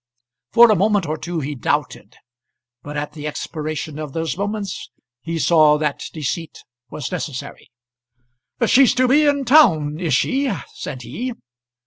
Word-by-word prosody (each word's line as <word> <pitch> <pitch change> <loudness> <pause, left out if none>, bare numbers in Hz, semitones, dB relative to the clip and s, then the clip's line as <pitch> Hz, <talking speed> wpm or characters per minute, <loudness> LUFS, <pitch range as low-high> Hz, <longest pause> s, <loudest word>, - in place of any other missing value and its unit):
For 235 -1 +7
a - - +4
moment 205 -1 +2
or 155 0 -2
two 170 +1 -4
he 145 +2 -4
doubted; 125 - -3 0.7
but 145 +1 -7
at 145 0 -3
the 150 -1 -6
expiration 155 0 -5
of 150 -3 -6
those 165 0 -2
moments 200 0 -4 0.3
he 165 +3 -4
saw 155 -2 +4
that 150 -2 -2
the 155 - -8
deceit 160 +3 -4 0.3
was 145 - -6
necessary. 155 -7 -6 1.0
"She's 255 +3 +5
to 255 0 +3
be 295 +4 +4
in 285 -1 +1
town, 165 - +4
is 165 -7 +1
she?" 265 - +1 0.2
said 125 -2 -7
he. 250 - -5
165 Hz, 150 wpm, -20 LUFS, 150-220 Hz, 1.0 s, For